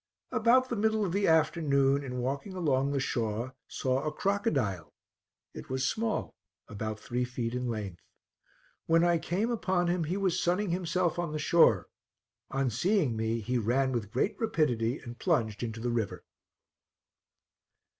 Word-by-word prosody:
About 255 Hz, +3 st, +4 dB
the 240 Hz, -, -1 dB
middle 220 Hz, 0 st, +1 dB
of 180 Hz, -, -2 dB
the 200 Hz, +2 st, +1 dB
afternoon, 145 Hz, -4 st, +3 dB
in 125 Hz, -2 st, -5 dB
walking 140 Hz, +10 st, -3 dB
along 140 Hz, -6 st, +1 dB
the 140 Hz, -, 0 dB
shore, 120 Hz, -1 st, -2 dB
saw 130 Hz, 0 st, -1 dB
a 155 Hz, -, -1 dB
crocodile; 140 Hz, -, -1 dB, 0.6 s
it -, -, -9 dB
was 130 Hz, +1 st, 0 dB
small, 225 Hz, 0 st, -1 dB, 0.3 s
about 110 Hz, 0 st, -5 dB
three 125 Hz, +3 st, -2 dB
feet 120 Hz, -1 st, -3 dB
in 125 Hz, 0 st, -2 dB
length. 105 Hz, -6 st, -4 dB, 0.9 s
When 165 Hz, +1 st, +4 dB
I 175 Hz, -1 st, +3 dB
came 200 Hz, +9 st, -1 dB
upon 185 Hz, -6 st, 0 dB
him, 175 Hz, -2 st, 0 dB
he 175 Hz, +5 st, -2 dB
was 190 Hz, -3 st, +1 dB
sunning 180 Hz, +2 st, +1 dB
himself 175 Hz, -1 st, 0 dB
on 170 Hz, -3 st, -2 dB
the -, -, -1 dB
shore; 150 Hz, -, +4 dB, 0.6 s
on 135 Hz, -2 st, 0 dB
seeing 150 Hz, -, +1 dB
me, 110 Hz, +1 st, -1 dB
he 125 Hz, +3 st, -1 dB
ran 130 Hz, +4 st, +1 dB
with 115 Hz, -5 st, -2 dB
great 195 Hz, -, 0 dB
rapidity 130 Hz, -, +1 dB
and 120 Hz, 0 st, -10 dB
plunged 115 Hz, -, 0 dB
into 115 Hz, -2 st, -4 dB
the 120 Hz, +1 st, -1 dB
river. 115 Hz, -4 st, -2 dB
140 Hz, 155 wpm, -30 LUFS, 120-175 Hz, 0.9 s, About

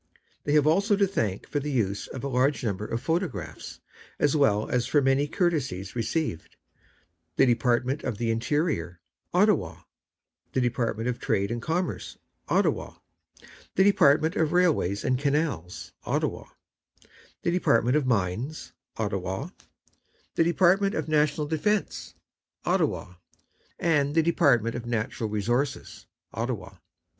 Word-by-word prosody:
They 145 Hz, -, +1 dB
have 150 Hz, -1 st, +4 dB
also 200 Hz, +7 st, +3 dB
to 200 Hz, 0 st, +3 dB
thank 110 Hz, -, -2 dB
for 145 Hz, -, -1 dB
the 145 Hz, +1 st, -4 dB
use 100 Hz, -6 st, -1 dB
of 130 Hz, -, -8 dB
a -, -, -1 dB
large 130 Hz, +2 st, +1 dB
number 105 Hz, -2 st, -2 dB
of 115 Hz, -, -3 dB
photographs, 165 Hz, -2 st, -3 dB, 0.4 s
as 145 Hz, +1 st, +2 dB
well 110 Hz, -8 st, +3 dB
as 125 Hz, -1 st, 0 dB
for 150 Hz, -, +3 dB
many 135 Hz, +1 st, +2 dB
courtesies 135 Hz, -, -1 dB
received, 115 Hz, -, -2 dB, 0.8 s
the -, -, +5 dB
Department 125 Hz, +3 st, +1 dB
of 110 Hz, -, -3 dB
the 115 Hz, 0 st, 0 dB
Interior, 115 Hz, -, -1 dB, 0.3 s
Ottawa, -, -, +2 dB, 0.7 s
the -, -, +1 dB
Department 120 Hz, -2 st, -1 dB
of 125 Hz, -1 st, -2 dB
Trade 100 Hz, +2 st, 0 dB
and 120 Hz, 0 st, -3 dB
Commerce, 170 Hz, +7 st, -3 dB, 0.3 s
Ottawa, -, -, +1 dB, 0.8 s
the 190 Hz, -, +5 dB
Department 165 Hz, -5 st, +4 dB
of 160 Hz, 0 st, +1 dB
Railways 155 Hz, -, +2 dB
and 130 Hz, -1 st, +1 dB
Canals, 140 Hz, -, -2 dB
Ottawa, -, -, -2 dB, 1.0 s
the 170 Hz, -, +1 dB
Department 125 Hz, -8 st, +2 dB
of 150 Hz, -4 st, +1 dB
Mines, 115 Hz, -, -2 dB, 0.2 s
Ottawa, 100 Hz, -, -3 dB, 0.8 s
the -, -, +3 dB
Department 190 Hz, +4 st, +3 dB
of -, -, -2 dB
National 150 Hz, -1 st, +2 dB
Defence, 175 Hz, +7 st, -1 dB, 0.5 s
Ottawa, 90 Hz, 0 st, 0 dB, 0.6 s
and 145 Hz, -3 st, +1 dB
the 165 Hz, -, +4 dB
Department 120 Hz, -8 st, +3 dB
of 120 Hz, -1 st, -6 dB
Natural 110 Hz, -1 st, -2 dB
Resources, 120 Hz, +7 st, -2 dB, 0.3 s
Ottawa. -, -, -4 dB
135 Hz, 130 wpm, -27 LUFS, 115-160 Hz, 1.0 s, the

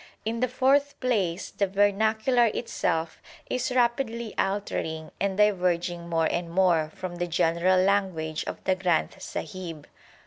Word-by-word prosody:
In 230 Hz, +1 st, -2 dB
the 255 Hz, -, +2 dB
fourth 275 Hz, +3 st, +2 dB
place, 200 Hz, -8 st, -1 dB
the 200 Hz, -, 0 dB
vernacular 220 Hz, +5 st, +2 dB
itself 165 Hz, -8 st, -2 dB, 0.3 s
is 255 Hz, 0 st, 0 dB
rapidly 235 Hz, -2 st, 0 dB
altering 160 Hz, -5 st, -2 dB
and 195 Hz, -1 st, -1 dB
diverging 180 Hz, -4 st, +1 dB
more 165 Hz, -1 st, +2 dB
and 170 Hz, +1 st, -1 dB
more 170 Hz, -3 st, +2 dB
from 180 Hz, -2 st, -6 dB
the 175 Hz, 0 st, -1 dB
general 170 Hz, +2 st, +2 dB
language 185 Hz, -5 st, 0 dB
of -, -, -6 dB
the 190 Hz, -, +2 dB
Granth 180 Hz, -3 st, 0 dB
Sahib. 165 Hz, -3 st, -6 dB
190 Hz, 135 wpm, -26 LUFS, 170-220 Hz, 0.3 s, the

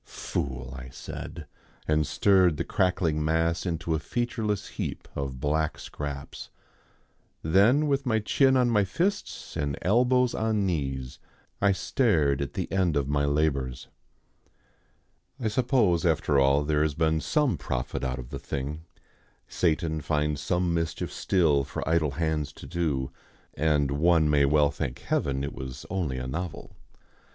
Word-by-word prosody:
"Fool!" 65 Hz, -1 st, -4 dB
I 65 Hz, -1 st, -8 dB
said, 80 Hz, +5 st, -8 dB, 0.4 s
and 75 Hz, -1 st, +2 dB
stirred 95 Hz, -6 st, +4 dB
the -, -, -1 dB
crackling 85 Hz, -4 st, +1 dB
mass 80 Hz, +3 st, +1 dB
into 85 Hz, -1 st, -2 dB
a 80 Hz, -, +1 dB
featureless 110 Hz, -2 st, -2 dB
heap -, -, -5 dB
of 70 Hz, -2 st, -4 dB
black 75 Hz, +2 st, 0 dB
scraps. 70 Hz, -1 st, -7 dB, 0.9 s
Then 100 Hz, -, +4 dB
with 140 Hz, -1 st, +1 dB
my 115 Hz, -4 st, +1 dB
chin 130 Hz, +5 st, +3 dB
on 125 Hz, -2 st, +3 dB
my 105 Hz, -3 st, +4 dB
fists 180 Hz, -, -2 dB
and 70 Hz, -1 st, -2 dB
elbows 125 Hz, +5 st, +3 dB
on 110 Hz, -2 st, 0 dB
knees 65 Hz, -7 st, -3 dB, 0.4 s
I 100 Hz, 0 st, +5 dB
stared 85 Hz, -, +1 dB
at 70 Hz, -, -3 dB
the -, -, -3 dB
end 90 Hz, -5 st, +2 dB
of 70 Hz, -2 st, 0 dB
my 70 Hz, 0 st, +1 dB
labours. 70 Hz, -3 st, 0 dB, 1.5 s
I 115 Hz, -4 st, 0 dB
suppose, 110 Hz, -7 st, +2 dB
after 75 Hz, -4 st, +2 dB
all, 70 Hz, +2 st, +4 dB
there 75 Hz, 0 st, +1 dB
has 75 Hz, -2 st, +1 dB
been 80 Hz, 0 st, +1 dB
some 150 Hz, -, +1 dB
profit 65 Hz, -4 st, -3 dB
out 65 Hz, -1 st, -1 dB
of 65 Hz, 0 st, -8 dB
the 70 Hz, -, -5 dB
thing. 75 Hz, +6 st, -5 dB, 0.6 s
Satan 80 Hz, -2 st, 0 dB
finds 75 Hz, -1 st, 0 dB
some 90 Hz, +3 st, 0 dB
mischief 80 Hz, -1 st, -2 dB
still 80 Hz, -7 st, +2 dB
for 70 Hz, -, -5 dB
idle 80 Hz, -3 st, +2 dB
hands 80 Hz, -3 st, -1 dB
to -, -, -11 dB
do, 70 Hz, -4 st, -1 dB, 0.4 s
and 75 Hz, -2 st, +1 dB
one 80 Hz, +1 st, +3 dB
may 70 Hz, -1 st, +4 dB
well 75 Hz, 0 st, +3 dB
thank 70 Hz, -3 st, -4 dB
Heaven 70 Hz, 0 st, -1 dB
it 70 Hz, -, -4 dB
was 65 Hz, 0 st, -7 dB
only 85 Hz, -9 st, -1 dB
a 65 Hz, -, -4 dB
novel. 80 Hz, +6 st, -5 dB
80 Hz, 150 wpm, -27 LUFS, 70-95 Hz, 1.5 s, I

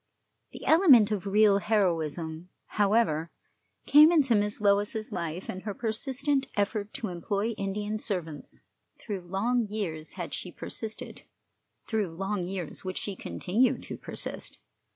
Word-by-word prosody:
The -, -, -9 dB
element 280 Hz, -, +6 dB
of 200 Hz, -2 st, -2 dB
real 205 Hz, 0 st, +5 dB
heroism, 170 Hz, -4 st, -1 dB, 0.2 s
however, 200 Hz, -6 st, +1 dB, 0.6 s
came 300 Hz, +3 st, +8 dB
into 285 Hz, -8 st, +4 dB
Miss 210 Hz, 0 st, +1 dB
Lois's 205 Hz, +1 st, +1 dB
life 170 Hz, +1 st, -4 dB
in 185 Hz, -, -5 dB
her 205 Hz, 0 st, -5 dB
persistent 265 Hz, +5 st, -1 dB
effort 205 Hz, +1 st, -1 dB
to 220 Hz, -, -2 dB
employ 200 Hz, +5 st, -2 dB
Indian 205 Hz, 0 st, -3 dB
servants. 165 Hz, -8 st, -4 dB, 0.4 s
Through 205 Hz, -4 st, -5 dB
long 215 Hz, +6 st, 0 dB
years 175 Hz, -7 st, -4 dB
had -, -, -6 dB
she -, -, -4 dB
persisted, 220 Hz, -1 st, -7 dB, 0.6 s
through 205 Hz, -7 st, -2 dB
long 195 Hz, +1 st, -2 dB
years 180 Hz, -3 st, -5 dB
would 185 Hz, -1 st, -4 dB
she 200 Hz, -, -3 dB
continue 220 Hz, +7 st, 0 dB
to -, -, -7 dB
persist. -, -, -6 dB
205 Hz, 130 wpm, -28 LUFS, 180-220 Hz, 0.6 s, came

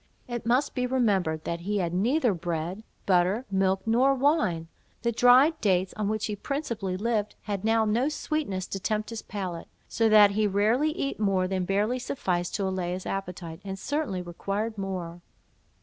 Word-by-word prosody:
It 240 Hz, -2 st, -5 dB
must 255 Hz, +4 st, +2 dB
be 250 Hz, -1 st, -1 dB
remembered, 195 Hz, -11 st, +1 dB
that 170 Hz, -, -3 dB
he 205 Hz, +4 st, -2 dB
had 175 Hz, -3 st, -1 dB
neither 240 Hz, -, +2 dB
bread, 170 Hz, +3 st, -4 dB, 0.2 s
butter, 190 Hz, +6 st, +2 dB
milk, 190 Hz, 0 st, +2 dB
nor 250 Hz, +5 st, +3 dB
wine; 260 Hz, -, +1 dB, 0.4 s
the 235 Hz, -, +2 dB
dried 255 Hz, +7 st, +5 dB
dates, 185 Hz, -3 st, +1 dB
on 210 Hz, -1 st, -2 dB
which 215 Hz, 0 st, -1 dB
he 210 Hz, -, -3 dB
principally 225 Hz, -7 st, -3 dB
lived, 210 Hz, 0 st, -1 dB
had 200 Hz, -2 st, -3 dB
now 225 Hz, 0 st, +3 dB
no 235 Hz, +7 st, +1 dB
sweetness 300 Hz, -12 st, -2 dB
to 195 Hz, -, -3 dB
tempt 215 Hz, +3 st, -2 dB
his 230 Hz, -, -5 dB
palate; 185 Hz, -5 st, -5 dB, 0.2 s
so 225 Hz, 0 st, +1 dB
that 210 Hz, -2 st, +7 dB
he 210 Hz, +1 st, +1 dB
rarely 215 Hz, +9 st, +2 dB
eat 280 Hz, -5 st, -3 dB
more 195 Hz, -3 st, +2 dB
than 185 Hz, -1 st, -1 dB
barely 210 Hz, +6 st, 0 dB
sufficed 180 Hz, -8 st, -2 dB
to 205 Hz, -, -1 dB
allay 185 Hz, -2 st, -2 dB
his 185 Hz, 0 st, -5 dB
appetite, 180 Hz, -3 st, -5 dB
and 195 Hz, -1 st, -5 dB
certainly 215 Hz, -6 st, -2 dB
required 200 Hz, +5 st, -3 dB
more. 180 Hz, -4 st, -5 dB
205 Hz, 175 wpm, -27 LUFS, 185-235 Hz, 0.4 s, that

